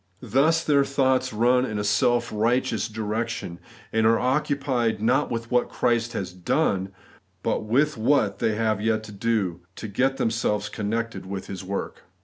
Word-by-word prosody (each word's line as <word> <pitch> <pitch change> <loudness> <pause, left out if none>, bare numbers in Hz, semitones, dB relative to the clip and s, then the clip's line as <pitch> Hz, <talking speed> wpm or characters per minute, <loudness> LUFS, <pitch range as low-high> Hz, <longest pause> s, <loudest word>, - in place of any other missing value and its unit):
Thus 140 +8 +2
their 140 -3 +4
thoughts 130 -2 +1
run 120 +3 +3
in 110 -5 -3
a 105 - -1
self 120 +4 +2
righteous 115 +2 +1
direction, 110 -4 -4 0.3
and 110 0 +3
are 115 0 +4
occupied, 130 -4 0
not 120 +5 +2
with 115 0 -4
what 125 0 +2
Christ 120 -1 0
has 95 -5 -4
done, 95 - 0 0.5
but - - -1
with 140 +6 +2
what 110 -5 +2
they 110 - +1
have 110 -2 0
yet 110 0 +1
to 110 - -10
do, 100 -4 -1 0.2
to 110 - -6
get 130 +6 0
themselves 110 -4 0
connected 115 -1 -3
with 95 0 -5
His 95 -1 -7
work. 100 +1 -4
115 Hz, 160 wpm, -25 LUFS, 105-125 Hz, 0.5 s, their